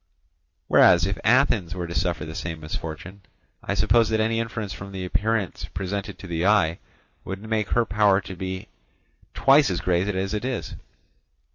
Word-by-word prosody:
Whereas, 85 0 +6
if 100 0 -2
Athens 110 -8 +3
were 90 -1 -3
to 85 - -6
suffer 85 -4 -1
the 80 - -7
same 80 -1 -5
misfortune, 80 +5 -7 0.4
I - - -3
suppose 115 -2 +3
that 110 0 +1
any 115 +1 +1
inference 110 -4 -4
from 100 +4 -9
the 95 -1 -4
appearance 105 0 -1
presented 95 +1 -4
to - - -11
the 85 -2 -2
eye 95 -5 +3 0.4
would 100 +3 -7
make 110 -2 -1
her 120 -1 +2
power 105 -2 +3
to - - -12
have 95 -2 -8
been 95 0 -4 0.7
twice 140 +1 +5
as 90 - -1
great 90 +1 +1
as 95 0 -2
it 105 - -2
is. 130 -1 -3
95 Hz, 175 wpm, -24 LUFS, 90-110 Hz, 0.7 s, Whereas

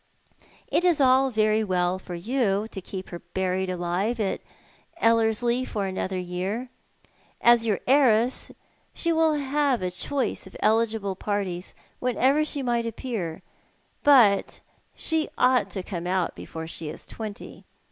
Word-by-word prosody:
" - - -30 0.3
It - - +1
is 350 -4 +3
all 265 0 +5
very 215 -2 +2
well 180 -2 0
for 180 -2 -7
you 215 +1 0
to 195 - -6
keep 185 0 -7
her 175 - -7
buried 185 +1 -2
alive 180 +6 -1
at 200 -3 -1 0.6
Ellerslic 230 +2 +2
for 205 -2 -2
another 190 0 -3
year. 185 +7 -3 0.7
As 235 -1 +5
your 210 - 0
heiress 250 -3 +3 0.4
she 335 -1 0
will 320 -1 +3
have 280 -5 0
a 180 - -1
choice 230 +3 -2
of - - -11
eligible 220 -3 +1
partis 190 -3 -3 0.2
whenever 260 +4 +2
she 290 -2 -3
may 240 -2 +1
appear; 220 -8 -4 0.6
but 240 -9 +5 0.4
she 320 -1 -1
ought 250 0 +3
to 190 - -5
come 175 -3 -5
out 185 -1 0
before 160 0 -7
she 160 -1 -6
is 155 - -9
twenty. 215 -2 -8
215 Hz, 145 wpm, -26 LUFS, 185-255 Hz, 0.7 s, all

